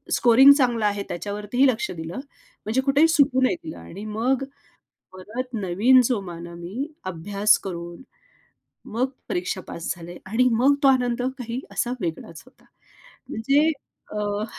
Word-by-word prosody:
Scoring 250 +4 +7
चांगलं 240 -6 +1
आहे 205 -1 0
त्याच्यावरतीही 210 +8 0
लक्ष 235 -3 0
दिलं. 165 +5 -6 0.5
म्हणजे 235 +5 +1
कुठेही 280 +4 +4
सुटू 280 -5 +3
नाही 260 - +3
दिलं 315 - -7
आणि 200 +5 -9
मग 240 +5 0 0.7
परत 235 +7 -6
नवीन 210 +6 +4
जो 245 -4 +1
मानवी 170 - -6 0.2
अभ्यास 200 +4 +2
करून 170 -1 -6 0.9
मग 255 +3 +1 0.2
परीक्षा 180 +1 -2
पास 170 - -4
झाले 175 +1 -10
आणि 245 +6 +2
मग 260 +5 +4
तो - - +8
आनंद 245 -2 +2 0.2
काही 240 +1 -4
असा 245 - -1
वेगळाच 165 -1 -5
होता. 255 - -23 0.7
म्हणजे 280 +8 +2 0.4
अ, 210 0 -2
225 Hz, 135 wpm, -24 LUFS, 185-255 Hz, 0.9 s, तो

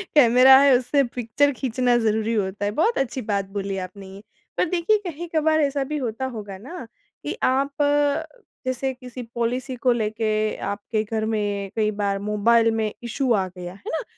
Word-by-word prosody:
Camera 260 -1 +8
है 280 -1 +6
उससे 275 +3 +1
picture 245 +3 0
खींचना 250 -1 +1
ज़रूरी 220 0 0
होता 200 -1 -1
है, 205 - 0
बहुत 335 - +1
अच्छी 265 0 -1
बात 200 -3 -1
बोली 195 -1 -2
आपने 190 +1 -7
ये। 195 +1 -11 0.4
पर - - +3
देखिए 360 +5 +2
कहीं-कभार 315 -1 0
ऐसा 280 -1 0
भी 300 +3 -3
होता 255 -1 -3
होगा 210 -6 -6
ना 265 - -9 0.4
कि - - -4
आप 275 +2 +1 0.9
जैसे 260 +1 -1
किसी 250 -1 -9
पॉलिसी 250 +3 -2
को 250 +1 +2
लेके 215 -1 -1
आपके 210 +2 -2
घर 220 0 -2
में, 205 -2 -2
कोई 215 -1 +1
बार 200 -1 0
मोबाइल 225 +3 +3
में 220 -1 -1
इश्यू 245 +2 -1
आ 195 -3 +1
गया, 180 -1 -8
है 195 - -8
ना। 320 - -2
230 Hz, 175 wpm, -23 LUFS, 210-265 Hz, 0.9 s, Camera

